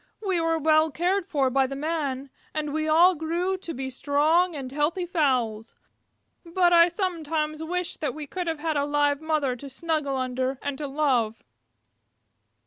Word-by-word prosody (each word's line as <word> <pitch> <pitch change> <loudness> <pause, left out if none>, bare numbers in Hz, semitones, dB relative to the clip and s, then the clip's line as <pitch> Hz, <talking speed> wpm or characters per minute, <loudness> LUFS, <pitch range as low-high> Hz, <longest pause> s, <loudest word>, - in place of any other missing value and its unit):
We 370 -4 +1
were 330 0 +1
very - - -6
well 310 +1 +4
cared 350 +6 0
for 270 -4 +1
by 265 0 +2
the 275 - -6
Men, 280 -3 -3 0.2
and 300 -1 -2
we 310 0 -1
all 345 +4 +6
grew 340 +4 -1
to 360 -3 -7
be 265 -2 -5
strong 310 +6 +2
and 265 -3 -6
healthy 300 +6 0
fowls, 255 - 0 0.7
but 350 +1 +2
I 335 0 +7
sometimes 320 -4 -2
wish 355 +2 -3
that 300 - -3
we 305 -1 -6
could 360 +4 -5
have 325 -1 -1
had 320 -2 0
a 285 - +1
live 290 0 +1
mother 305 -5 0
to 275 +3 -9
snuggle 300 -1 -2
under 255 +1 -2
and 285 -1 -2
to 295 - -3
love." 260 -6 0
305 Hz, 175 wpm, -26 LUFS, 275-335 Hz, 0.7 s, I